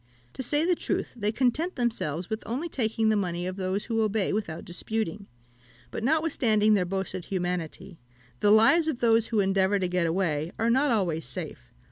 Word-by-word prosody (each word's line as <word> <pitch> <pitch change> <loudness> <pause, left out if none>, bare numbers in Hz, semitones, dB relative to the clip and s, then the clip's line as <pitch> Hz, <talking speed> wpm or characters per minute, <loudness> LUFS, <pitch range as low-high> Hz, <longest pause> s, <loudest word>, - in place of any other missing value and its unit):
To - - -5
say 295 +5 +1
the 360 - +3
truth, - - -2
they 210 -3 -1
content 270 +10 0
themselves 185 - -2
with 220 0 -3
only 265 +9 -2
taking 225 -6 0
the 215 - +3
money 175 -3 -1
of 185 0 -3
those 190 +1 -2
who 225 -1 0
obey 215 -2 0
without 200 -7 -3
disputing; 205 +1 -4 0.6
but - - -5
notwithstanding 240 -8 +2
their 190 -3 +2
boasted 185 -1 -4
humanity, 180 -1 -4 0.4
the 205 - +3
lives 225 +10 +5
of 295 -6 -1
those 230 -1 +3
who 220 -3 +1
endeavour 195 +1 +2
to 185 -2 0
get 180 -1 0
away 165 -2 -1
are 230 +1 +1
not 270 +4 +3
always 175 - 0
safe. 65 - -7
210 Hz, 180 wpm, -27 LUFS, 180-235 Hz, 0.6 s, lives